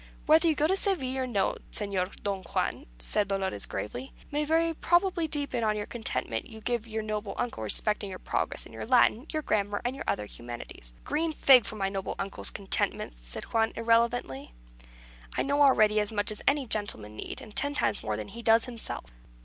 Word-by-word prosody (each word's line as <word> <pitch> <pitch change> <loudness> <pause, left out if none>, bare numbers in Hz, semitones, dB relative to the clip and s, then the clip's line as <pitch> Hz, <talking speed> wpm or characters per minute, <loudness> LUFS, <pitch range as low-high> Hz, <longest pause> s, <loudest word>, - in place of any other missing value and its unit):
"Whether 320 +2 +5
you 315 - +3
go 295 - +2
to 370 +5 +3
Seville 345 -11 +1
or 260 - -1
no, 200 -6 0
Señor 200 -3 -1
Don 200 -2 -1
Juan," 170 - -2
said 200 - +1
Dolores, 190 - -2
gravely, 120 +5 -5 0.2
"may 295 +1 0
very 330 +2 +2
probably 345 +1 +2
depend 285 -6 -2
on 215 -1 +2
the 205 - -3
contentment 210 - -3
you 220 - -10
give 235 0 -2
your 220 -1 -3
noble 215 -1 -3
uncle 240 - -2
respecting 205 - +1
your 185 - -6
progress - - -2
in - - -13
your - - -6
Latin, 250 +1 +4
your 310 -1 -2
grammar, 205 -3 0
and 250 +2 -1
your 275 - -6
other 105 - 0
humanities." 120 - -9
"A - - -25
green 315 +3 -1
fig 265 -6 +6
for - - -5
my 195 -2 -1
noble 195 -1 -3
uncle's 195 0 +1
contentment!" 190 - -1
said - - -6
Juan, 225 -1 +1
irreverently. 230 - +1 0.8
"I - - +2
know 285 +1 +1
already 215 -6 +5
as 210 0 0
much 205 -1 0
as 210 - -5
any 280 -1 +3
gentleman 205 - 0
need, - - -6
and 215 - -12
ten 285 0 +2
times 245 - +1
more 105 -1 -2
than 105 - -6
he 235 - -8
does 225 0 +5
himself." 235 - -5
220 Hz, 200 wpm, -29 LUFS, 195-275 Hz, 0.8 s, fig